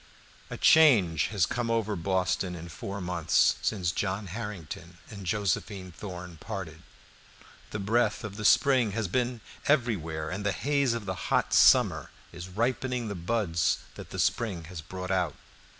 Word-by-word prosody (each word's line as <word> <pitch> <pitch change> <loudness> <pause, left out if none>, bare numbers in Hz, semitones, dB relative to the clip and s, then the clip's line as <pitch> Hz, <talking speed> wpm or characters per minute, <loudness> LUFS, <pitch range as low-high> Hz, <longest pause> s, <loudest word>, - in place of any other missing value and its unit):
A - - -6
change 110 - +5
has 100 -6 +1
come 120 +3 -2
over 110 -2 0
Boston 95 0 0
in 85 0 -8
four 95 +4 -6
months, 90 -3 +2
since 90 -6 0
John 95 +3 -2
Harrington 90 -4 -7
and 100 -3 -8
Josephine 95 0 -1
Thorn 90 -2 -8
parted. 85 -4 -7 0.9
The - - -4
breath 105 +2 +1
of 105 -2 -6
the 105 - -6
spring 120 -1 +4
has 110 -2 -1
been 125 +6 0
busy 115 - -13 0.3
everywhere, 85 - 0
and 95 +3 -4
the 100 -1 +1
haze 140 - +1
of 115 -3 -5
the 95 -1 -4
hot - - +1
summer - - +5 0.2
is 85 +2 -8
ripening 120 +3 -1
the - - -3
buds 85 -3 0 0.2
that - - -10
the - - -7
spring 100 -8 0
has 85 0 -8
brought 90 +3 -6
out. 90 -5 0
100 Hz, 160 wpm, -28 LUFS, 90-115 Hz, 0.9 s, change